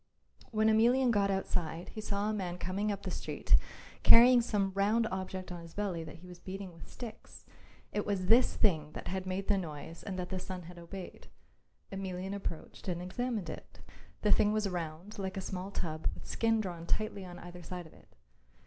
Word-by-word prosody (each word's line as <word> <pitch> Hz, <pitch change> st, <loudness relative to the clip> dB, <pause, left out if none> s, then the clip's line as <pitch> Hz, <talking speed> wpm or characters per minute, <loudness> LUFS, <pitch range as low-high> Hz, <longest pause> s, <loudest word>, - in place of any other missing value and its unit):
When 215 Hz, -1 st, +3 dB
Emelian 240 Hz, +4 st, +5 dB
got 200 Hz, -2 st, +3 dB
outside 175 Hz, -3 st, -1 dB
he 215 Hz, -, -6 dB
saw 205 Hz, 0 st, 0 dB
a 215 Hz, -, +1 dB
man 180 Hz, -4 st, -2 dB
coming 195 Hz, +4 st, -1 dB
up 200 Hz, 0 st, -4 dB
the 185 Hz, -, -3 dB
street -, -, +2 dB, 0.5 s
carrying 245 Hz, +1 st, +9 dB
some 205 Hz, -4 st, +1 dB
round 210 Hz, +4 st, +3 dB
object 185 Hz, -1 st, -4 dB
on 175 Hz, -1 st, -5 dB
his 165 Hz, 0 st, -12 dB
belly 190 Hz, -5 st, -1 dB
that 155 Hz, -, -8 dB
he 175 Hz, +2 st, -13 dB
was 180 Hz, -1 st, -10 dB
beating 190 Hz, -1 st, -6 dB
with 165 Hz, -, -12 dB
sticks. 230 Hz, -3 st, -9 dB, 0.5 s
It 210 Hz, -, 0 dB
was 200 Hz, -3 st, 0 dB
this 230 Hz, +6 st, +6 dB
thing 155 Hz, -8 st, +2 dB
that -, -, -5 dB
had 190 Hz, 0 st, -2 dB
made 190 Hz, +1 st, -2 dB
the 200 Hz, -2 st, +4 dB
noise 160 Hz, -1 st, -6 dB
and 190 Hz, -2 st, -4 dB
that 180 Hz, -1 st, -3 dB
the 185 Hz, -, -2 dB
son 180 Hz, -1 st, -5 dB
had 175 Hz, +1 st, -10 dB
obeyed. 180 Hz, +2 st, -8 dB, 0.6 s
Emelian 190 Hz, 0 st, -3 dB
approached 195 Hz, -4 st, -5 dB
and 175 Hz, -2 st, -1 dB
examined 210 Hz, +2 st, -2 dB
it. -, -, -8 dB, 0.4 s
The 210 Hz, -, +4 dB
thing 210 Hz, 0 st, +5 dB
was 215 Hz, -1 st, +1 dB
round 175 Hz, +3 st, -4 dB
like 190 Hz, 0 st, -3 dB
a -, -, +1 dB
small 185 Hz, 0 st, -4 dB
tub 160 Hz, -5 st, -2 dB
with -, -, -11 dB
skin 225 Hz, -1 st, +2 dB
drawn 170 Hz, -4 st, -5 dB
tightly 215 Hz, -2 st, 0 dB
on 175 Hz, -1 st, -8 dB
either 175 Hz, 0 st, -9 dB
side 175 Hz, +1 st, -6 dB
of 160 Hz, -, -14 dB
it. -, -, -21 dB
190 Hz, 200 wpm, -33 LUFS, 175-210 Hz, 0.6 s, carrying